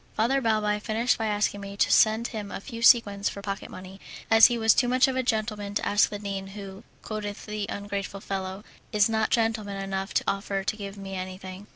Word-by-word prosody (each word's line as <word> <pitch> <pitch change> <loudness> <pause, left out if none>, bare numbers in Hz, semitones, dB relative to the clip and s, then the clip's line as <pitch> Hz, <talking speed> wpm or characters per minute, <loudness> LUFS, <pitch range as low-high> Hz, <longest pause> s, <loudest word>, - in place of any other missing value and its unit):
Father 260 +5 +2
Balbi 215 -3 +1
finished 230 +4 0
by 220 - 0
asking 205 -1 0
me 200 0 -8
to - - +2
send 220 +2 +4
him 210 -3 -6
a - - -5
few 230 +3 -8
sequins 205 -4 +5
for 200 - -8
pocket 195 -1 -5
money, 190 +1 -11 0.3
as 225 0 +9
he 240 - -1
was 225 -1 +5
too 245 - +2
much 255 +2 +4
of 265 - -2
a 260 - +1
gentleman 215 -4 -2
to - - 0
ask 205 +1 +4
the 205 - -5
dean 200 -1 -5
who, 195 +1 -9 0.2
quoth 210 -1 -5
the 210 -1 -4
ungrateful 200 -1 -4
fellow, 195 0 -5 0.3
"is 210 -1 +4
not 220 -1 0
gentleman 220 -3 0
enough 195 0 -3
to - - +3
offer 195 0 -1
to 205 - -1
give 200 -1 -7
me 195 -1 -7
anything." 185 +1 -7
205 Hz, 215 wpm, -26 LUFS, 195-220 Hz, 0.3 s, as